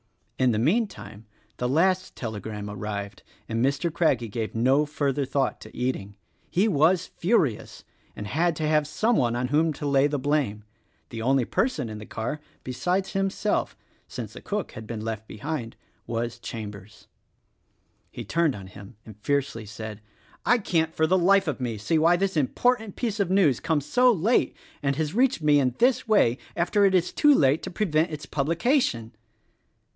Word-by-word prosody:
In 130 - +4
the 110 - +1
meantime 155 - -1 0.3
the 125 - -1
last 185 +6 +1
telegram 105 -2 -5
arrived 100 -1 -5 0.3
and 115 +1 -1
Mr. 140 +5 0
Craggie 130 -9 +1
gave 110 +1 -4
no 135 +6 +3
further 145 -2 -1
thought 135 0 -1
to - - -12
eating. 105 -6 -2 0.3
He 195 +5 +2
was 175 0 +3
furious, 165 - -1 0.3
and 105 - -6
had 165 +10 +1
to 155 0 -2
have 150 -1 +2
some 225 +9 +1
one 120 -3 +1
on 125 +1 -1
whom 155 +3 +2
to 145 - -7
lay 140 0 +3
the 145 0 -2
blame. 135 -7 -1 0.5
The 115 - -6
only 130 +1 +2
person 255 - 0
in 110 -1 -7
the 105 - -10
car 120 +7 -4
— - - -35
besides 180 +10 -1
himself 195 +2 -1 0.2
— - - -37
since - - -7
the - - -10
cook 205 -1 -3
had 110 0 -9
been 115 -2 -5
left 110 -1 -4
behind 125 -1 -5 0.2
— - - -41
was 115 -1 -3
Chambers. 105 -3 -8 1.0
He - - -8
turned 165 -4 +1
on 95 -2 -9
him 100 +4 -12
and 110 - -11
fiercely 135 -6 -1
said, 105 0 -7 0.4
"I 245 - +4
can't 165 -7 0
for 160 - +3
the 185 +3 +3
life 195 +1 +4
of 145 -3 -2
me 120 -3 -2
see 155 +10 +1
why 165 +3 +5
this 195 +1 -1
important 220 - +1
piece 225 -4 -2
of 195 -3 +1
news 180 - +3
comes 155 -4 0
so 250 +6 +4
late, 215 +4 +1 0.2
and 140 -1 0
has 155 +1 -2
reached 250 -6 +2
me 150 -1 +5
in 125 -3 +1
this 250 +1 +2
way 140 - +3 0.2
after 175 +4 +2
it 190 -1 +3
is 180 -1 +1
too 295 -1 +5
late 140 - +3
to - - -5
prevent 170 -4 +1
its 155 -1 -6
publication." 155 - 0
145 Hz, 180 wpm, -26 LUFS, 115-180 Hz, 1.0 s, why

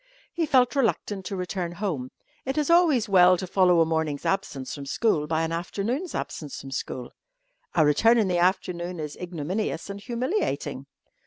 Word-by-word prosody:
He 330 -2 -1
felt 255 -1 +3
reluctant 210 -6 0
to 195 - -4
return 180 -1 -3
home. 165 -10 -3 0.3
It 265 +3 -3
is 300 +1 +1
always 315 -10 +4
well 185 -2 +6
to 185 - -4
follow 180 -2 +4
a - - +5
morning's 160 -3 -1
absence 170 -9 -2
from 140 -2 -7
school 155 -5 +1
by 160 +1 0
an 165 - -2
afternoon's 210 - -3
absence 150 -3 -5
from 135 - -9
school. 125 -1 -5 0.6
A 160 -3 +5
return 225 +11 +4
in 215 -4 +3
the 180 -1 +1
afternoon 180 -1 0
is 150 -1 -5
ignominious 180 +3 -3
and 200 0 -8
humiliating. 255 - -2
185 Hz, 170 wpm, -26 LUFS, 160-225 Hz, 0.6 s, well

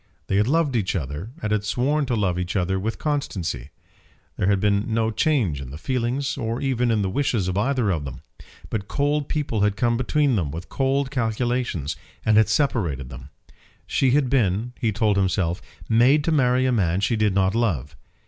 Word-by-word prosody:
They 95 - 0
had 105 +2 +3
loved 150 -2 +2
each 100 -5 0
other 75 - -4
and 105 - -1
had 105 -1 +1
sworn 135 +7 0
to 125 - 0
love 95 -5 0
each 90 +2 -3
other 95 0 0
with 110 +4 -3
constancy. 95 - -3 0.7
There 95 - 0
had 100 -1 +3
been 105 +2 +1
no 110 0 +1
change 110 - +1
in 65 - -8
the 70 - -8
feelings 130 - -2
or 115 0 -2
even 125 -3 0
in 110 -3 +2
the - - 0
wishes 120 -6 0
of 95 - -1
either 120 0 +1
of 80 -5 -1
them. 65 -3 -7 0.5
But 105 -2 -3
cold 145 0 0
people 140 -8 -1
had 105 -1 +2
come 120 +1 +1
between 135 0 +1
them 80 -7 -1
with 80 +4 -7
cold 135 0 0
calculations, 120 - -1 0.3
and 110 - +4
had 110 0 +5
separated 95 - 0
them. 65 +1 -10 0.6
She 135 - +1
had 135 +1 +3
been, 120 -2 +1
he 115 -4 +1
told 105 -1 +1
himself, 95 -3 0 0.3
made 125 +6 +4
to 165 - 0
marry 130 -3 +3
a 130 - +2
man 95 -5 +1
she 100 +3 +1
did 105 -3 +1
not 95 0 +2
love. 80 - -1
110 Hz, 195 wpm, -23 LUFS, 95-130 Hz, 0.7 s, had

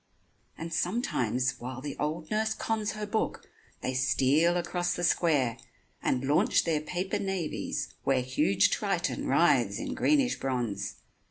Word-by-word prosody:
And 165 0 -6
sometimes, 130 - 0
while 130 +1 -6
the 140 +1 -5
old 155 +2 -3
nurse 220 +1 +1
cons 220 -1 -1
Her 215 -1 -4
book, 215 +1 -2 0.3
they 130 - -2
steal 135 +6 +3
across 175 0 -1
the 175 - -4
square, 145 -10 +2 0.4
And 130 +1 0
launch 145 +3 +3
their 160 -3 0
paper 180 +4 -2
navies 190 -5 -3
where 130 -2 +2
Huge 100 -6 +2
Triton 200 -2 -1
writhes - - +3
in - - -4
greenish 280 -4 +2
bronze. 115 -7 -2
155 Hz, 140 wpm, -29 LUFS, 130-190 Hz, 0.4 s, steal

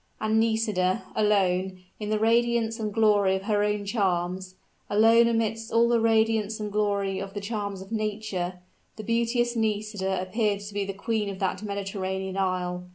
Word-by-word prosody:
And 215 +1 +2
Nisida 220 -3 +1
alone, 190 -3 +1 0.2
in 210 -1 -4
the 215 - +1
radiance 230 +1 +2
and 215 -1 -2
glory 205 -3 +3
of 190 - -4
her 205 0 +1
own 210 -1 -1
charms 185 -3 -1 0.3
alone 225 +3 +5
amidst 225 -1 -1
all 230 +1 +4
the 235 0 +3
radiance 220 -1 +2
and 210 -1 -4
glory 200 -2 0
of 195 +1 -7
the - - -2
charms 200 -2 -4
of 195 - -17
nature 210 -5 -3 0.3
the 215 - -7
beauteous 235 +2 0
Nisida 210 -3 -1
appeared 205 +2 -1
to 205 0 -8
be 200 -1 -1
the 195 - -4
queen 210 +1 -2
of 195 - -6
that 190 0 -2
Mediterranean 190 -2 -4
isle. 180 -2 -2
210 Hz, 165 wpm, -26 LUFS, 190-225 Hz, 0.3 s, alone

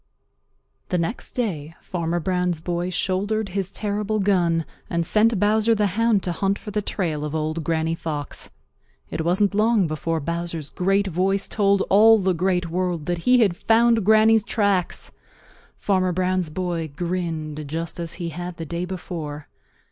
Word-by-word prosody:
The 180 - +1
next 175 +8 -3
day 165 - -3
Farmer 170 -1 -2
Brown's 180 -1 0
boy 175 +2 -2
shouldered 200 +4 -1
his 190 0 -2
terrible 210 +1 -2
gun 175 -5 +2 0.2
and 170 0 0
sent 220 +3 +3
Bowser 215 +2 +3
the 210 -1 +2
Hound 230 -2 +2
to 180 - -1
hunt 195 +3 0
for 210 - -8
the 210 0 0
trail 165 -7 -2
of 150 +1 -3
Old 155 +1 -2
Granny 160 0 0
Fox. 150 -3 -4 0.6
It 160 - -2
wasn't 190 +4 +2
long 215 -1 +3
before 160 +1 -2
Bowser's 170 -1 -4
great 195 +2 +1
voice 190 +2 0
told 200 -2 +2
all 220 +3 +7
the 190 -2 +1
Great 180 0 0
World 175 -2 -2
that 175 -1 -1
he 250 -1 +6
had 195 -6 +3
found 225 +2 +3
Granny's 220 +1 +5
tracks. 200 -5 0 0.7
Farmer 185 -2 +1
Brown's 185 -1 0
boy 170 0 -2
grinned 160 -4 -3
just 165 +3 -4
as 170 -2 -3
he 170 -2 -4
had 175 +2 -6
the 165 - -5
day 170 +2 -3
before. 160 -5 -6
180 Hz, 160 wpm, -23 LUFS, 165-205 Hz, 0.7 s, all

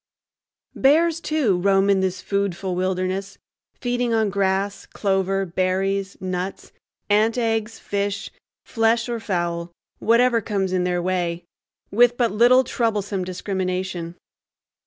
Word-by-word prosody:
Bears, 320 +4 +3
too, 270 - +1
roam 195 +1 +3 0.2
this 185 -1 -2
foodful 200 -2 -1
wilderness, 185 +2 -2 0.4
feeding 245 -2 0
on 220 -2 +1
grass, 195 0 -1
clover, 195 -1 0
berries, 190 +2 -1
nuts, 185 +1 -4 0.4
ant 215 +3 +3
eggs, 225 -1 -1
fish, 200 0 -3 0.3
flesh, 225 0 +1
or 235 -1 -3
fowl,—whatever 195 +6 0
comes 195 -3 -1
in 180 -1 +1
their 175 -1 0
way,—with 185 +6 -1
but 235 -2 +2
little 245 +4 +5
troublesome 210 -6 -1
discrimination. 185 -2 -3
195 Hz, 105 wpm, -22 LUFS, 185-225 Hz, 0.4 s, little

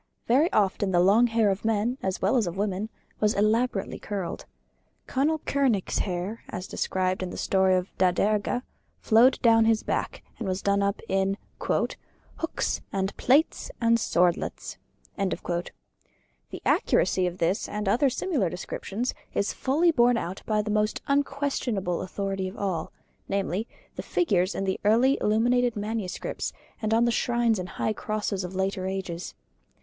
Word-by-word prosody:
Very 280 +8 +3
often 200 -1 +2
the 180 -2 +3
long 205 +7 +5
hair 225 -3 +2
of 195 - -3
men, 225 +4 0
as 190 -1 -2
well 195 +7 +3
as 230 -7 +2
of 175 +2 -4
women, 200 +1 -1 0.3
was 210 0 +2
elaborately 215 0 +1
curled. 195 -4 -4 0.6
Conall 300 +3 +1
Kernach's 260 -9 +1
hair, 190 +4 -3
as 180 - -5
described 185 -1 -1
in 185 - -3
the - - -7
story 190 -1 +3
of 180 +1 -2
Da 185 -1 +5
Derga, 210 +6 0 0.4
flowed 240 +4 +5
down 225 -1 +6
his 225 -1 +2
back, - - -2 0.2
and 225 - -3
was 185 +1 -2
done 200 0 +2
up 200 +1 0
in 195 +1 +1 1.0
"hooks 325 - -2
and 195 0 -2
plaits 285 +6 +2
and 230 0 +3
swordlets." 175 -5 0 0.4
The 175 -2 -6
accuracy 185 -1 +2
of 175 0 -5
this 180 +6 0
and 210 -1 -3
other 250 +8 +3
similar 260 - 0
descriptions 200 +6 -4 0.2
is 200 - 0
fully 315 +6 +2
borne 245 -4 +4
out 185 -3 -4
by 215 -1 +1
the 210 - -3
most 210 0 +1
unquestionable 275 -10 0
authority 195 0 -3
of 185 - -8
all, 185 -5 -2 0.4
namely, 200 +2 -1 0.3
the - - -4
figures 195 - +1
in - - -2
the 190 -1 -1
early 235 +6 +4
illuminated 240 +3 +2
manuscripts 210 -3 -3 0.3
and 215 -1 -1
on 230 +1 +4
the 235 - +2
shrines 235 -3 +1
and 180 0 -5
high 215 - -1
crosses 210 -2 -2
of 180 +1 -6
later 190 0 -1
ages. 185 -2 -4
210 Hz, 155 wpm, -26 LUFS, 190-235 Hz, 1.0 s, down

